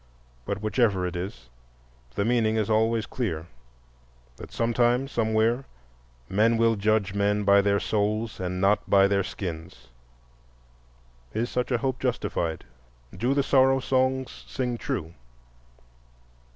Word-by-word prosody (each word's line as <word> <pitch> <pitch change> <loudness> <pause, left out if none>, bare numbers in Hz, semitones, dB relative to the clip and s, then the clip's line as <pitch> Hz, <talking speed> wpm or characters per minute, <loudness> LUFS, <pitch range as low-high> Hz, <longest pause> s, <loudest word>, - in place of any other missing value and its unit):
But 105 - -4
whichever 110 -4 +1
it 90 0 -4
is, 90 - -6 0.6
the 100 - 0
meaning 115 -2 +2
is 110 -1 0
always 110 +1 +2
clear: 85 -11 -3 0.9
that - - -10
sometime, 120 +2 +1
somewhere, 115 +1 +1 0.6
men 110 +4 +2
will 115 0 +3
judge 105 -1 +1
men 100 +1 +1
by 100 0 +5
their 100 0 +2
souls 110 +2 -1
and 90 0 -3
not 100 +3 +2
by 100 0 +6
their 100 -1 +1
skins. 80 -8 -7 1.5
Is 115 +2 -1
such 125 0 -1
a 120 - +3
hope 130 +2 -2
justified? 85 -10 -2 0.5
Do 125 +4 0
the 140 - +2
Sorrow 135 -1 +4
Songs 130 0 -1
sing 125 -2 -2
true? 80 +1 -4
110 Hz, 125 wpm, -26 LUFS, 100-120 Hz, 1.5 s, by